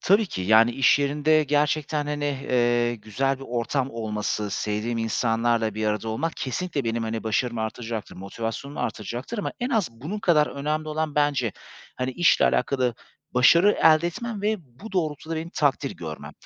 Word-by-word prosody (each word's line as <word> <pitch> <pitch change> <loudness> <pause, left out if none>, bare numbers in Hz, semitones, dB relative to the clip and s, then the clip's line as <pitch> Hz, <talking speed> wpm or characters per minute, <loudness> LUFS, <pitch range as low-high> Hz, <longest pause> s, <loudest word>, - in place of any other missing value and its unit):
Tabii 205 +3 +4
ki. 95 - -5
Yani, 110 +4 +5
iş 135 +3 +4
yerinde 150 +2 +2
gerçekten, 150 +1 0
hani, 145 0 -2
eee, 120 -4 +1
güzel 130 +6 -1
bir 135 - -9
ortam 125 +3 -1
olması, 105 -2 -3
sevdiğim 105 +3 -2
insanlarla 115 0 +1
bir 110 0 -1
arada 105 +1 -1
olmak 155 +9 -2
kesinlikle 145 +1 -3
benim, 115 0 -1
hani, 115 0 -3
başarımı 115 +1 0
artıracaktır, 110 0 -5
motivasyonumu 115 +8 -5
artıracaktır. 120 - -4
Ama 205 - -2
en 245 - -1
az 220 - +1
bunun 150 - -6
kadar 165 -7 +3
önemli 155 +2 -3
olan 155 -1 -2
bence, 145 -6 +1 0.4
hani, 130 0 -1
işle 175 +5 +4
alakalı 130 -3 +1 0.4
başarı 170 +11 +6
elde 160 +1 +6
etmem 210 +4 -5
ve 215 +1 +1 0.2
bu 220 -1 -9
doğrultuda 160 -2 -2
benim 165 +2 -5
takdir 145 -4 +1
görmem. 80 -2 -7
135 Hz, 160 wpm, -25 LUFS, 115-155 Hz, 0.4 s, başarı